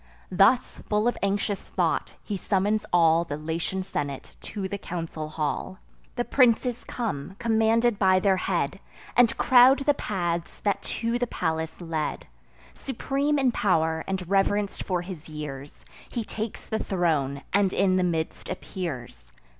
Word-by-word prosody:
Thus, 195 +7 +3
full 210 +2 +2
of 240 - +1
anxious 200 0 0
thought, - - 0
he 205 - -3
summons 200 +2 0
all 165 -1 +5
The 145 -3 -5
Latian 165 +4 -3
senate 140 -6 -4
to 200 -3 -4
the 200 +1 -5
council 165 -4 -5
hall. 155 +4 -3 0.4
The 240 -1 -1
princes 245 -1 +3
come, 195 - -4
commanded 225 0 +2
by 185 -1 +5
their 195 -1 +3
head, 180 -2 -1 0.4
And 235 -1 +4
crowd 260 +2 +6
the 290 - +5
paths 175 -8 -3
that 200 -2 0
to 230 +1 -2
the 245 - 0
palace 160 -4 -2
lead. 160 -3 -3 0.5
Supreme 275 +3 -1
in 265 -3 +3
pow'r, 160 -7 +1
and 190 -2 -3
reverenc'd 200 +1 +1
for 180 -2 -1
his 175 -4 -8
years, 145 -2 -8 0.2
He 235 - -3
takes 215 0 -5
the 220 - -2
throne, 150 -7 0
and 200 -2 +3
in 185 -1 +2
the 185 - +2
midst 165 -3 -2
appears. 130 - -6
190 Hz, 145 wpm, -26 LUFS, 160-220 Hz, 0.5 s, crowd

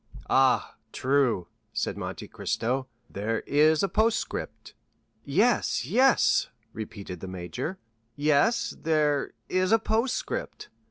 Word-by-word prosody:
"Ah, 130 -4 +3
true," 130 -9 +1 0.3
said - - -1
Monte - - -6
Cristo 130 +3 -2 0.2
"there 110 +3 -2
is 155 +3 +3
a - - +3
postscript." 215 - -1 0.5
"Yes, 200 - +2
yes," 250 - +3 0.2
repeated 100 -4 -7
the 95 - -7
major, 95 - -5 0.4
"yes—there—is—a—postscript." 185 - 0
145 Hz, 85 wpm, -27 LUFS, -, 0.5 s, Ah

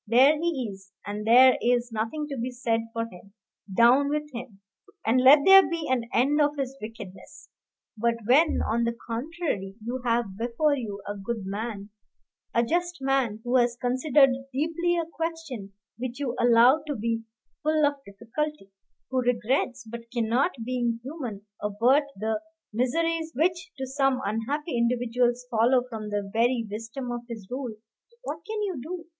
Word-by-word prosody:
There 260 +7 +6
he 305 -6 -1
is, 195 0 -15 0.2
and 210 +1 -5
there 255 +3 +7
is 245 0 +1
nothing 225 +8 -3
to 280 - -4
be 245 0 -3
said 235 -2 -1
for 230 0 -2
him 195 -2 -14 0.4
down 245 +7 +5
with 300 0 -2
him! 235 -4 -8 0.5
and 250 +3 +3
let 275 +3 +8
there 390 0 +10
be 330 -2 -3
an 235 -2 0
end 285 +6 +3
of 295 0 +1
his 270 -1 -3
wickedness. 215 -4 -10 0.5
But 230 +1 +1
when, 295 +8 +4
on 230 +2 0
the 235 0 -2
contrary, 235 - -3
you 240 +4 -4
have 230 -5 0
before 245 +6 +1
you 210 -6 -6
a 205 - -3
good 205 +1 -4
man, 205 +1 -5 0.6
a 235 - +2
just 350 +5 -1
man, 265 -5 0
who 245 +1 +2
has 240 -1 +2
considered 260 +2 +4 0.2
deeply 330 +5 0
a 335 - 0
question 325 -11 -5 0.3
which 250 +1 -5
you 260 -4 -2
allow 245 +5 +6
to 290 - -2
be 230 0 -1 0.4
full 310 0 +2
of 285 -1 -1
difficulty; 230 +2 -5 0.4
who 260 -1 +1
regrets, 245 +1 0
but 230 +1 -9
cannot, 240 +5 +1 0.2
being 240 -2 -1
human, 250 -8 -6 0.2
avert 235 +8 +3
the 220 +1 -1 0.3
miseries 325 +7 0
which 350 +4 0
to 265 - -3
some 270 0 +1
unhappy 245 - -2
individuals 240 +1 +1
follow 240 +3 +3
from 220 -3 -6
the 205 -1 -2
very 235 +1 +2
wisdom 230 +4 -5
of 240 0 -3
his 220 -5 -7
rule, 250 -3 -4 0.5
what - - -4
can 430 -1 -2
you 375 -8 -3
do? 335 +4 -6
245 Hz, 160 wpm, -26 LUFS, 230-285 Hz, 0.6 s, there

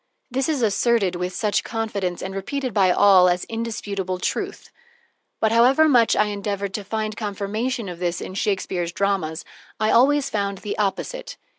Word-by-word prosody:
This 265 +3 0
is 285 -6 0
asserted 215 -3 +2
with 180 +1 -3
such 210 +2 0
confidence 205 -6 -3
and 190 +1 -5
repeated 255 +6 -3
by 195 -3 +4
all 185 -1 +6
as 175 0 0
indisputable 205 -5 -4
truth; 180 - -4 0.7
but 220 - +2
however 255 +7 +5
much 240 -6 +4
I 210 - +3
endeavored 200 -1 -3
to 210 - -3
find 215 +1 -3
confirmation 215 +3 -3
of 175 -2 -7
this 175 -1 -1
in - - -7
Shakespeare's 190 -4 -1
dramas, 180 -5 -1 0.3
I 215 +1 +2
always 275 +3 +4
found 200 -5 -2
the 205 +2 -5
opposite. - - -3
205 Hz, 160 wpm, -23 LUFS, 190-230 Hz, 0.7 s, all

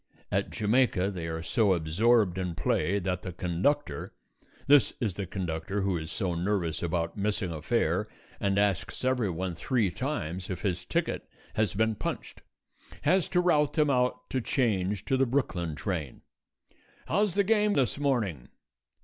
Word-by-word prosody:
At - - 0
Jamaica 105 -3 +2
they 85 -4 -5
are 80 0 -4
so 100 +3 +3
absorbed 95 +4 +2
in 90 -3 -2
play 90 +5 +1
that 90 -2 -2
the 90 - -5
conductor 90 - -1 0.5
this 145 -1 +5
is 110 -7 -1
the 100 +1 -4
conductor 90 +1 -3
who 95 -1 +1
is 80 -1 -4
so 95 -3 -1
nervous 85 -2 -1
about 85 -1 -1
missing 100 -3 -1
a 80 -2 -5
fare 75 - +1 0.3
and 100 -1 +1
asks 100 +3 0
everyone 95 -9 0
three 105 +3 0
times 95 - -3
if 90 -3 -4
his 90 -3 -1
ticket - - -2 0.2
has 105 -4 0
been 110 +2 +2
punched - - -5 0.6
has 180 +4 +3
to 180 - +3
rout 150 -5 +3
them 150 -2 +3
out 125 -1 0
to 130 - 0
change 105 -7 0
to 130 - +1
the 135 0 +3
Brooklyn 90 - -1
train. 75 - -4 0.8
"How's 205 -2 +1
the 200 - +4
game 210 0 +3
this 135 - +1
morning?" 110 - 0
100 Hz, 160 wpm, -29 LUFS, 85-125 Hz, 0.8 s, this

